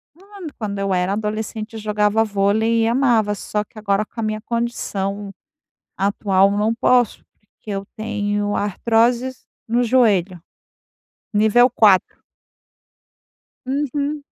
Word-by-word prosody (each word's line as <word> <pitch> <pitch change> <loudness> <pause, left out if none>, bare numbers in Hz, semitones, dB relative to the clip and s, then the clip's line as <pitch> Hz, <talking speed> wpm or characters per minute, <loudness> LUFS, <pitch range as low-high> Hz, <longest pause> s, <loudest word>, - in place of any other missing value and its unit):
Quan 390 0 -11
quando 205 -3 -4
eu 195 -1 0
era 180 +1 0
adolescente, 215 +1 -4
eu 225 - -6
jogava 210 +1 +1
vôlei 220 +2 +1
e 225 - +2
amava. 235 -4 +2
Só 210 +1 -3
que 215 - -14
agora, 205 0 0
com 230 - -12
a - - -1
minha 215 0 -2
condição 205 -4 -3 0.6
atual, 195 0 +2
eu 205 - -1
não 215 +2 +1
posso, 245 -1 +2 0.2
porque 210 +1 -14
eu 195 -1 -3
tenho 205 -1 -2
artroses 235 +5 0 0.2
no 240 +2 +2
joelho, 205 -8 +2 0.9
nível 220 +4 +4
4. 205 -6 +3 1.4
Uhum. 285 +2 -2
215 Hz, 125 wpm, -20 LUFS, 205-235 Hz, 1.4 s, nível